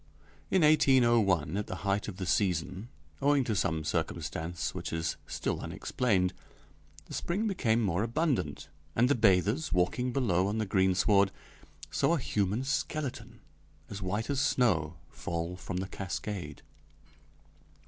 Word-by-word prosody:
In 190 -3 +3
1801, 120 - +4
at 105 - -2
the - - -4
height 100 +1 0
of 100 -4 -6
the 95 - -3
season, 90 +3 0 0.3
owing 145 -1 +4
to 115 -3 -1
some 85 -5 0
circumstance 80 +1 -3
which - - -5
is 80 -1 -1
still - - -2
unexplained, 95 -7 0 0.7
the - - -11
spring 195 +6 -1
became 120 - +1
more 95 -2 +1
abundant, 120 - -1 0.3
and 120 +3 +4
the - - +5
bathers, 110 - +2
walking 90 +8 +1
below 100 -8 +1
on 105 +2 -1
the 110 - 0
greensward, 95 +1 +3 0.6
saw 170 - +2
a - - -1
human 105 0 0
skeleton 145 0 -3 0.5
as 100 0 -6
white 105 +7 -2
as 140 -1 +1
snow 110 - +2 0.2
fall 85 +1 -4
from 90 0 -5
the 95 +1 -2
cascade. 95 -5 -5
100 Hz, 140 wpm, -30 LUFS, 90-125 Hz, 0.7 s, the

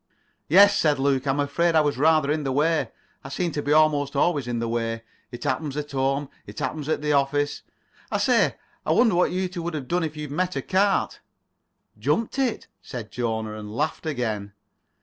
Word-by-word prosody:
"Yes," 200 +5 +7
said 150 -2 +3
Luke, 135 0 +1
"I'm 135 +1 +1
afraid 165 +4 +1
I 160 - +6
was 145 -1 0
rather 155 -1 +4
in 155 0 -1
the 135 - -1
way. 155 +4 +1 0.3
I 135 - -8
seem 175 +4 -2
to 145 - -2
be 145 - -2
almost 150 -2 +3
always 145 -3 +1
in 120 -1 -2
the 115 0 -2
way. 115 0 -2 0.3
It 120 - -8
happens 140 +2 -2
at 150 -1 -4
home. 135 +1 0 0.2
It - - -11
happens 155 -1 -3
at 155 - -1
the 150 0 +1
office. 145 +1 +1 0.5
I - - 0
say, - - +3 0.3
I - - +1
wonder 230 -4 +4
what 175 +1 +3
you 185 +1 -1
two 180 -1 -6
would 170 -1 -4
have 140 -4 -5
done 175 +3 0
if 155 -1 -4
you'd 150 -2 -6
met 180 +5 -1
a - - -2
cart?" 195 +1 +1 0.8
"Jumped 230 +4 0
it," 255 -4 0 0.2
said 115 -4 -8
Jona, 110 -3 -2
and 105 0 -8
laughed 155 +4 -2
again. 110 -8 -3
145 Hz, 205 wpm, -24 LUFS, 135-160 Hz, 0.8 s, Yes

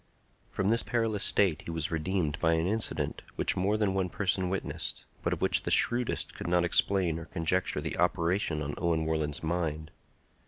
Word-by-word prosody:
From 100 +2 0
this 115 - +4
perilous 115 -4 0
state 95 -6 +3
he - - -6
was 80 -1 -3
redeemed 80 -1 -1
by 80 0 +3
an 80 0 +1
incident 110 +4 -1
which - - 0
more 100 +4 +1
than 105 -3 +1
one 95 -2 0
person 95 -1 0
witnessed, 95 0 -3 0.2
but - - -1
of - - -2
which - - +3
the - - -3
shrewdest 120 0 +2
could - - -6
not 90 0 +3
explain 85 -1 +2
or 85 - -8
conjecture 85 +3 -1
the - - -4
operation 85 -3 +1
on 70 +1 -4
Owen 80 -2 +1
Warland's 80 -2 -1
mind. 80 -1 -2
85 Hz, 185 wpm, -30 LUFS, 80-95 Hz, 0.2 s, this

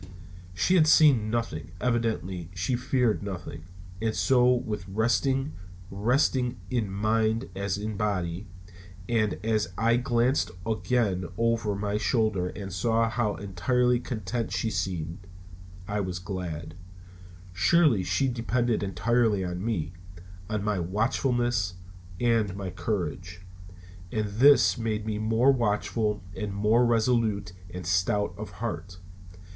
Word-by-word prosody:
She 95 - +2
had 165 -4 +5
seen 140 -9 +5
nothing; 110 -8 -3
evidently 110 -8 -1
she 90 +8 0
feared 125 -2 +1
nothing, 90 -4 -6 0.4
and 110 -1 0
so 125 -2 +3
was 110 -7 -2
resting, 130 +7 +1 0.4
resting 125 +4 +1
in 115 -5 0
mind 110 +3 0
as 100 -1 -2
in 105 0 -4
body. 95 -3 -2 0.6
And 110 -4 +1
as 110 -2 +1
I 115 +1 +3
glanced 120 +1 +1 0.2
again 110 -5 0
over 115 -2 +1
my 105 +1 -1
shoulder 110 -5 +1
and 95 -1 -7
saw 115 +4 +1
how 115 -4 0
entirely 120 +6 +1
content 115 -2 -3
she 100 +4 -1
seemed, 90 -1 -3 0.6
I 105 0 -1
was 90 -3 -2
glad. 85 -3 -5 0.8
Surely 115 - +4
she 90 +9 +1
depended 120 -1 0
entirely 100 +2 +1
on 90 +1 -4
me; 90 -7 -2 0.6
on 105 -2 -2
my 105 -2 0
watchfulness 115 +1 0 0.4
and 115 -5 +1
my 100 -2 -5
courage. 90 -2 -4 0.7
And 110 -1 0
this 130 +5 +5
made 110 -2 -2
me 105 -1 -2
more 115 +5 +3
watchful 105 -3 0
and 105 -2 -4
more 110 +4 +3
resolute 110 -5 +1 0.2
and 90 -1 -7
stout 90 +3 +1
of 105 +2 -7
heart. 90 -2 -5
110 Hz, 125 wpm, -27 LUFS, 95-120 Hz, 0.8 s, had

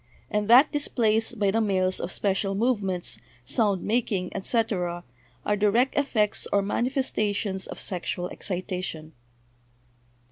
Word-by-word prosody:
and 210 0 0
that 255 +6 +7
displays 225 -6 +1
by 205 -4 0
the 225 +2 +1
males 185 -3 +1
of 175 - -4
special 195 0 0
movements, 195 - 0 0.3
sound 205 - +1
making, 210 -5 -1
etc.,, 190 -4 -1 0.4
are 210 - +2
direct 210 +6 +2
effects 220 -7 +1
or 200 0 +3
manifestations 210 -4 -1
of - - -8
sexual 180 -1 -3
excita 185 -1 -4
tion." 160 -3 -6
205 Hz, 120 wpm, -26 LUFS, 185-225 Hz, 0.4 s, that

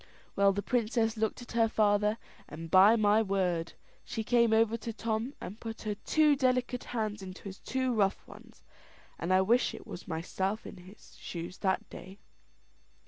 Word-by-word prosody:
Well, 200 0 +4
the 200 +1 -3
princess 230 -1 0
looked 220 +2 -2
at - - -12
her 230 -1 +2
father, 210 0 +2 0.3
and 165 +1 -8
by 195 +4 +7
my 215 0 +4
word, 185 -5 -1 0.3
she 220 - -4
came 235 0 +3
over 225 0 +3
to 230 0 -5
Tom, 225 +4 -3
and 205 +5 -8
put 225 -1 -7
her 215 -1 -1
two 300 +7 +3
delicate 255 -2 0
hands 215 -3 -3
into 185 0 -9
his 195 -1 -8
two 260 +1 -1
rough 200 -3 0
ones, - - -15 0.6
and 170 - -2
I 185 0 +5
wish 235 +6 +2
it - - -11
was 175 - -9
myself 190 +5 -2
was - - -8
in 180 -2 -14
his 195 +3 -16
shoes 170 +1 -7
that 190 -1 0
day! 190 +2 -10
215 Hz, 180 wpm, -30 LUFS, 190-230 Hz, 0.6 s, by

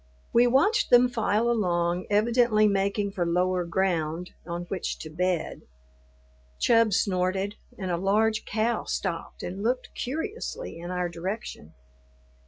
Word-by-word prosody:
We 240 +1 +6
watched 275 - +3
them 245 0 +6
file 225 -1 +1
along, 175 -6 0
evidently 215 0 +3
making 200 0 0
for 190 -3 -1
lower 180 +1 +1
ground 170 -1 -1 0.2
on 170 0 -4
which 180 0 -4
to 155 - -8
bed. 180 0 -1 1.0
Chub 230 -2 +4
snorted, 190 0 0 0.2
and 190 -3 -3
a 170 - 0
large 215 +4 +2
cow 220 +2 -1
stopped 175 -4 -4
and 190 +3 -5
looked 250 +4 -1
curiously 415 - -4
in 175 +1 -7
our 180 -1 -1
direction. 170 - -6
195 Hz, 130 wpm, -27 LUFS, 180-225 Hz, 1.0 s, We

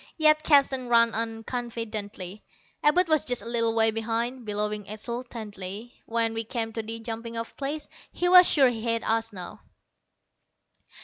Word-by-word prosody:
Yet 310 -1 +5
Keston 275 -4 +3
ran 230 -1 +5
on 225 0 -3
confidently. 215 -5 -5 0.4
Abud 355 +5 +4
was 310 -3 +3
just 245 -1 0
a - - -8
little 230 -1 +1
way 225 0 +4
behind, 230 +2 -3
bellowing 210 0 -3
exultantly, 215 -2 -6
when 230 0 +1
we 225 0 -2
came 225 -1 -3
to 225 - -3
the 225 +1 -6
jumping 230 0 -6
off 230 0 -5
place. 290 +2 -4 0.2
He 355 - -1
was 360 0 +8
sure 270 -4 +5
he 230 -2 -4
had 230 0 -1
us 225 0 0
now. 185 -3 -8
230 Hz, 160 wpm, -26 LUFS, 225-250 Hz, 0.4 s, was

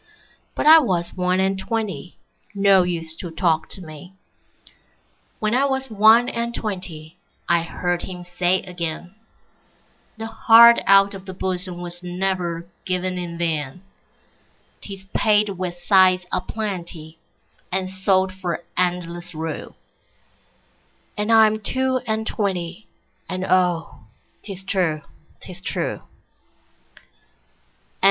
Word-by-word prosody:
'But - - -2
I 320 +1 +10
was 180 - -1
one 180 0 0
and 190 0 +1
twenty, 210 -4 -4 0.4
No 195 -1 +5
use 165 -3 -3
to 175 - -6
talk 160 -1 0
to 190 - -8
me. 160 +4 -11 1.2
When 215 +1 -1
I 265 +3 +3
was 265 -2 -2
one 220 +3 +6
and 235 0 -3
twentyI 175 -7 -6 0.5
heard 175 +1 -2
him 180 -1 -7
say 180 +1 0
again,'The 180 +5 -10
heart 235 +1 +7
out 195 0 +6
of 195 0 -10
the 190 - -7
bosomWas 180 -2 -4
never 180 -2 -2 0.2
given 185 0 -2
in 170 -1 -6
vain;'Tis 170 +4 -8
paid 210 -1 +3
with 185 -2 -4
sighs 185 0 +4
a - - 0
plentyAnd 180 -2 -6
sold 190 0 +1
for 180 -2 -4
endless 175 -1 -2
rue.'And 165 +6 -9
I 225 -1 +8
am 215 0 +1
two 260 +3 0
and 220 0 -1
twenty, 190 -2 -3 0.4
And 185 0 -3
oh, 180 -3 +1 0.4
'tis 195 -2 -8
true, 175 -6 -1 0.4
'tis - - -11
true. - - -3
185 Hz, 110 wpm, -22 LUFS, 175-205 Hz, 1.2 s, I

